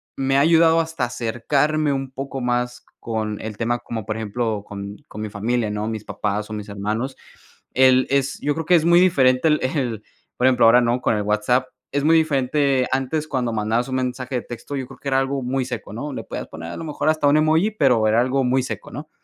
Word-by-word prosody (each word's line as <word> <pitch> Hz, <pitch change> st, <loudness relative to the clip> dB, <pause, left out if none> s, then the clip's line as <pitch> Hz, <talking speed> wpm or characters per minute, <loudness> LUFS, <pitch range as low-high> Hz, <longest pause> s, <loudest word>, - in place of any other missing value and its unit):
me 135 Hz, 0 st, +1 dB
ha -, -, +5 dB
ayudado 165 Hz, +1 st, +5 dB
hasta 160 Hz, -6 st, -2 dB
acercarme 140 Hz, +6 st, 0 dB
un 135 Hz, -1 st, -4 dB
poco 135 Hz, 0 st, -5 dB
más 125 Hz, 0 st, -2 dB
con 110 Hz, -2 st, -3 dB
el 110 Hz, -1 st, -6 dB
tema, 120 Hz, +1 st, 0 dB
como 110 Hz, -4 st, -6 dB
por 110 Hz, 0 st, -3 dB
ejemplo, 110 Hz, -1 st, -2 dB
con 100 Hz, 0 st, -7 dB
con 105 Hz, -, -8 dB
mi 110 Hz, -, -4 dB
familia, 110 Hz, +1 st, -1 dB
¿no?, 105 Hz, +1 st, -3 dB
mis 110 Hz, -1 st, -5 dB
papás 105 Hz, 0 st, -3 dB
o -, -, -4 dB
mis 105 Hz, 0 st, -6 dB
hermanos. 105 Hz, +6 st, -3 dB, 0.6 s
El 130 Hz, 0 st, +5 dB
es 140 Hz, 0 st, 0 dB
yo 145 Hz, 0 st, 0 dB
creo 160 Hz, 0 st, -4 dB
que 180 Hz, -, +6 dB
es 165 Hz, -2 st, +3 dB
muy 170 Hz, +1 st, +6 dB
diferente 130 Hz, -7 st, +4 dB
el 150 Hz, -1 st, +3 dB
el, 130 Hz, -6 st, -2 dB, 0.3 s
por 125 Hz, -, +1 dB
ejemplo, 130 Hz, -3 st, +5 dB
ahora, 120 Hz, +2 st, +7 dB
¿no?, 120 Hz, +1 st, +1 dB
con 110 Hz, -, +1 dB
el 105 Hz, -, -1 dB
WhatsApp, 105 Hz, +5 st, +1 dB, 0.3 s
es 140 Hz, 0 st, -1 dB
muy 160 Hz, +2 st, +5 dB
diferente 140 Hz, -3 st, +1 dB
antes 135 Hz, +4 st, -1 dB
cuando 125 Hz, -4 st, -1 dB
mandabas 110 Hz, +3 st, 0 dB
un 130 Hz, -, -3 dB
mensaje 130 Hz, 0 st, -3 dB
de 125 Hz, -, 0 dB
texto, 120 Hz, +4 st, -7 dB
yo 135 Hz, -2 st, -3 dB
creo 135 Hz, -, -14 dB
que -, -, -9 dB
era 135 Hz, -1 st, +2 dB
algo 135 Hz, +1 st, -1 dB
muy 130 Hz, +1 st, -1 dB
seco, 125 Hz, -5 st, -6 dB
¿no?, 140 Hz, +7 st, -5 dB
le -, -, -5 dB
podías -, -, -6 dB
poner 85 Hz, +1 st, -8 dB
a -, -, -7 dB
lo -, -, -6 dB
mejor 155 Hz, 0 st, -1 dB
hasta 155 Hz, -2 st, +2 dB
un 145 Hz, +2 st, +5 dB
emoji, 160 Hz, +7 st, +3 dB
pero 125 Hz, -, +3 dB
era 110 Hz, +2 st, +4 dB
algo 130 Hz, +1 st, +1 dB
muy 130 Hz, +1 st, +2 dB
seco, 130 Hz, -, -6 dB
¿no? 150 Hz, +4 st, -8 dB
130 Hz, 230 wpm, -22 LUFS, 110-140 Hz, 0.6 s, ahora